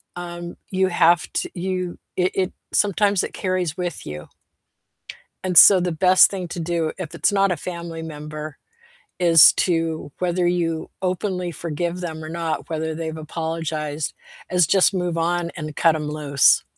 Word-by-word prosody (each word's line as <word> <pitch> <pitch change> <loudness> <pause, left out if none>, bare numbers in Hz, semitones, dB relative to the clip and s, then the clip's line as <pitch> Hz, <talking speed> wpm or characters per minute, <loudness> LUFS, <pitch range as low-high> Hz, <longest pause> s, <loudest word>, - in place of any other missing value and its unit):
um, 175 0 -7 0.2
you 190 0 +2
have 175 -1 +3
t - - -2
you 185 -1 -3 0.2
it 185 0 +2
it 185 -1 -1 0.2
sometimes 205 -1 +2
it - - -5
carries 185 -4 -2
with 175 -2 -4
you. 75 0 -7 1.2
And 185 -2 0
so 190 +3 +9
the 180 0 -1
best 185 +3 +5
thing 185 -3 -5
to 175 - -6
do 165 -1 -1
if 170 -4 -6
it's 170 - +1
not 195 -1 +2
a 180 - -1
family 170 -2 -6
member 150 -1 -7 0.6
is 165 -3 +7
to 165 -4 -1
whether 180 0 0
you 170 -2 -1
openly 180 -1 -2
forgive 170 +2 -4
them 160 -3 -5
or - - -7
not, 165 -1 -3
whether 160 -1 -3
they've 160 0 -5
apologized, 155 -1 -4 0.4
is 180 -2 +3
just 190 +4 +4
move 180 -3 -2
on 170 +1 0
and 155 -2 -6
cut 165 -1 +4
'em 150 -1 -3
loose. 145 -2 +3
170 Hz, 160 wpm, -22 LUFS, 160-180 Hz, 1.2 s, so